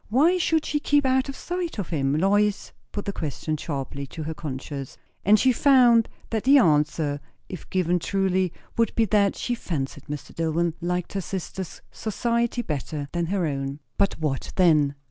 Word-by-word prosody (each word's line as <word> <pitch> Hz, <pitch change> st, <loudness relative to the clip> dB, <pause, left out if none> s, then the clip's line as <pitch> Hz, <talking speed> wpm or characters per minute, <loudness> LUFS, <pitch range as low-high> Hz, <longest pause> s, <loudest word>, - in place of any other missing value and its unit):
Why 315 Hz, +11 st, +4 dB
should 320 Hz, -2 st, +2 dB
she 295 Hz, -, 0 dB
keep 290 Hz, -1 st, +2 dB
out 260 Hz, +1 st, +2 dB
of 275 Hz, -, -5 dB
sight 350 Hz, -1 st, -4 dB
of 200 Hz, -, -3 dB
him? 140 Hz, -3 st, 0 dB
Lois 205 Hz, +3 st, +2 dB, 0.2 s
put 205 Hz, -, -5 dB
the 200 Hz, -, -2 dB
question 155 Hz, -1 st, -3 dB
sharply 140 Hz, -2 st, -4 dB
to 160 Hz, -, -7 dB
her 160 Hz, +1 st, -3 dB
conscience. 140 Hz, -2 st, -6 dB, 0.3 s
And 210 Hz, +2 st, +5 dB
she 260 Hz, -, +4 dB
found 245 Hz, -3 st, +5 dB, 0.2 s
that 220 Hz, -2 st, -1 dB
the 275 Hz, +2 st, +7 dB
answer, 150 Hz, -, +2 dB, 0.3 s
if 185 Hz, -, -8 dB
given 180 Hz, -1 st, +1 dB
truly, 190 Hz, -1 st, +1 dB, 0.3 s
would 230 Hz, 0 st, +1 dB
be 225 Hz, -, +3 dB
that 200 Hz, -1 st, +2 dB
she 245 Hz, -, -2 dB
fancied 145 Hz, -, -4 dB
Mr. 150 Hz, -1 st, -7 dB
Dillwyn 165 Hz, +1 st, 0 dB
liked 180 Hz, 0 st, -2 dB
her 195 Hz, -, -1 dB
sister's 190 Hz, -1 st, -6 dB
society 235 Hz, +2 st, -1 dB
better 145 Hz, -, -4 dB
than 170 Hz, -1 st, -1 dB
her 190 Hz, -1 st, 0 dB
own. 140 Hz, -1 st, -3 dB, 0.2 s
But 200 Hz, -1 st, +2 dB
what 150 Hz, -4 st, -2 dB
then? 155 Hz, -6 st, +4 dB
185 Hz, 175 wpm, -25 LUFS, 150-230 Hz, 0.3 s, the